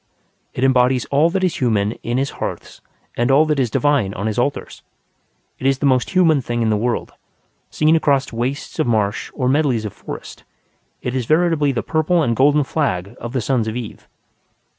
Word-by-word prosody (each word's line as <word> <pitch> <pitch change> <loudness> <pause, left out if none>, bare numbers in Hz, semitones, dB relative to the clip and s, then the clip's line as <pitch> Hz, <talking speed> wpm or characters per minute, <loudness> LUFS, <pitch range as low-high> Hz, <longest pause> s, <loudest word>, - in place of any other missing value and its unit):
It 125 - -2
embodies 125 -1 +3
all 145 +4 +4
that 190 +2 -1
is 185 - 0
human 110 -5 +1
in 120 +1 -2
his 135 +1 -1
hearths - - -6 0.3
and 120 +2 0
all 140 +4 +5
that 150 -2 0
is 125 -3 +1
divine 125 -6 +1
on 100 - -4
his 110 +1 -1
altars. 140 +4 -3 0.8
It 130 - -1
is 135 -1 +2
the 145 - -2
most 130 -2 +2
human 165 -6 +3
thing 120 -1 -2
in 110 - +1
the - - +2
world; 115 +3 -2 0.6
seen 155 +1 +2
across 140 -5 +1
wastes 125 +5 -4
of - - +1
marsh 105 -3 0
or 130 -3 -1
medleys 130 -5 +1
of 105 - -5
forest, - - -9 0.6
it 125 - -2
is 125 -3 -2
veritably 155 -3 +2
the 125 - -3
purple 160 +2 +1
and 115 -4 0
golden 145 +4 +4
flag 115 - -2
of 120 +1 -7
the 130 - 0
sons 115 0 0
of 110 - -3
Eve. 120 -3 -7
130 Hz, 195 wpm, -19 LUFS, 115-145 Hz, 0.8 s, all